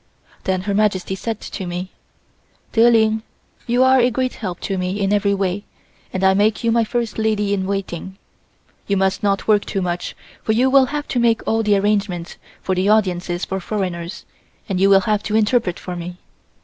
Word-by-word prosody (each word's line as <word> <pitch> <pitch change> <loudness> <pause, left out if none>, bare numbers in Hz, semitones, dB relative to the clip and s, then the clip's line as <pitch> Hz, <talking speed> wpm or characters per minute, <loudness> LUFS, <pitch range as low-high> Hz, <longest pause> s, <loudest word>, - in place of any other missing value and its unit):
Then 185 -1 0
Her 200 +2 -2
Majesty 195 -3 +1
said 220 +3 -4
to 190 -3 -6
me: 180 +2 -5 0.8
"Der 230 +1 +6
Ling 220 -1 +3 0.5
you 245 +2 +3
are 260 0 +5
a 245 0 +4
great 255 +1 -1
help 185 -6 -5
to 195 - -2
me 185 +3 -2
in 200 0 +1
every 200 -1 +2
way 195 0 -1 0.5
and 190 - -3
I 190 0 +5
make 210 +4 +2
you 230 - +2
my 230 0 +3
first 230 -1 -2
lady 210 -2 +1
in 190 -2 -1
waiting. 190 -1 -4 0.7
You 200 - +1
must 190 +1 +1
not 200 -1 0
work 210 -2 +4
too 195 - -3
much 175 0 -3 0.3
for 220 - 0
you 255 +4 +3
will 270 -1 +6
have 290 +1 -4
to 245 - 0
make 230 -1 +2
all 225 0 +2
the 210 -2 +3
arrangements 195 -4 -1 0.3
for 190 - 0
the 185 +2 +1
audiences 180 -4 +1
for 190 - -3
foreigners 180 -3 -4 0.4
and 190 -2 -1
you 195 +1 +4
will 195 -1 +6
have 210 0 0
to 215 0 -2
interpret 220 -4 +2
for 180 - -6
me. 175 +1 -6
200 Hz, 200 wpm, -20 LUFS, 190-220 Hz, 0.8 s, Der